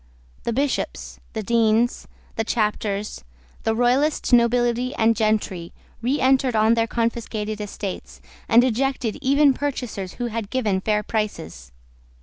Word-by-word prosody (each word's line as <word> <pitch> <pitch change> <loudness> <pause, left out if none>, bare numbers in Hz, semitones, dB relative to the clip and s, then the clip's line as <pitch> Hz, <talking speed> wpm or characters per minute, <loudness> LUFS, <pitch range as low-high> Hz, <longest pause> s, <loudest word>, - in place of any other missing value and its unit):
The - - 0
bishops, 275 +4 -2
the 220 -2 -3
deans, 230 +2 +2 0.3
the 225 - 0
chapters, 210 - -2 0.4
the 225 - 0
Royalist 255 +5 +1
nobility 240 +1 +3
and 225 +1 +3
gentry, 210 -5 -1 0.3
reentered 260 0 +2
on 220 +1 +4
their 230 -1 +1
confiscated 220 -2 -2
estates, 200 -2 -6 0.3
and 235 +2 +6
ejected 255 -1 -1
even 280 +1 +4
purchasers 250 -9 -4
who 245 - -4
had 225 -3 -4
given 215 -7 0
fair 210 +1 0
prices. 80 - -4
230 Hz, 125 wpm, -23 LUFS, 215-250 Hz, 0.4 s, and